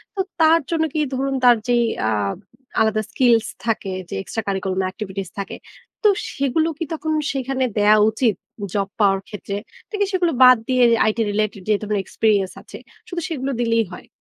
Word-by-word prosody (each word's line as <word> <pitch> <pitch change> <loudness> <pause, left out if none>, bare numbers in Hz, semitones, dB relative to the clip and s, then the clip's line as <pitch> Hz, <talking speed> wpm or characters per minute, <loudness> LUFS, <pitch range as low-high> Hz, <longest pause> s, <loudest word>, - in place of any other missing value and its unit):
তো - - -7 0.2
তার 320 +1 +6
জন্য 325 -1 +1
কি 310 - -1 0.2
ধরুন 270 +1 -1
তার 245 -2 +7
যে 245 - +3 0.4
আব 100 - -1 0.4
আলাদা 220 0 +2
স্কিলস 230 -4 +3 0.2
থাকে 215 -4 -1 0.2
যে - - -5
extra 225 - -4
curriculum 190 -1 -1
activities 190 -2 -6
থাকে। 200 - -5 0.5
তো 425 - +7 0.2
সেগুলো 280 +4 +1
কি 330 - -2
তখন 315 0 -2 0.2
সেখানে 265 -1 -2
দেয়া 210 +1 +5
উচিত? 220 -2 +1 0.4
জব 200 -1 0
পাওয়ার 195 -2 +4
ক্ষেত্রে? 205 -1 -6 0.3
নাকি 415 -2 0
সেগুলো 360 -3 +1
বাদ 255 -1 +9
দিয়ে 255 -1 +4 0.3
IT 220 - -3
related 210 -1 -1
যেহেতু 210 0 +1
আমার 210 -1 0
experience 205 -4 +1
আছে - - -11 0.3
শুধু 350 -2 -4
সেগুলো 275 -4 -2
দিলেই 230 -1 +2
হয়? 180 - -10
225 Hz, 170 wpm, -21 LUFS, 205-275 Hz, 0.5 s, বাদ